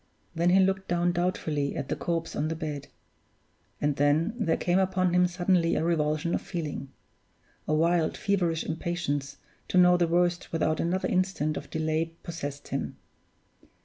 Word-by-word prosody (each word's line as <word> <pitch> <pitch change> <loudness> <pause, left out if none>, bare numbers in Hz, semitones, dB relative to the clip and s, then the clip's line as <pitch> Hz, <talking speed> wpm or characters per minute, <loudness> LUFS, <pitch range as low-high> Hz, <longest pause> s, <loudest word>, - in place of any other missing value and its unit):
Then 170 +1 +2
he 185 +2 +5
looked 190 0 +2
down 175 0 +1
doubtfully 165 -5 -1
at 140 - -4
the - - 0
corpse 165 -1 -2
on 155 - 0
the 160 - -2
bed; 150 -3 -5 0.9
and 145 -1 0
then 145 +8 +2
there 215 -9 +1
came 180 +1 +2
upon 185 -1 +1
him 180 0 +4
suddenly 175 -1 +1
a - - 0
revulsion 155 0 0
of - - 0
feeling. 150 -6 -5 0.8
A 155 - +2
wild, 165 +1 +2
feverish 175 -5 0
impatience 155 -4 -2 0.3
to - - 0
know 180 0 +7
the 175 -1 +2
worst 175 +1 +1
without 160 -2 0
another 180 +3 0
instant 185 -5 0
of - - -6
delay 160 +1 -1
possessed 145 -4 -6
him. - - -3
170 Hz, 160 wpm, -28 LUFS, 155-180 Hz, 0.9 s, know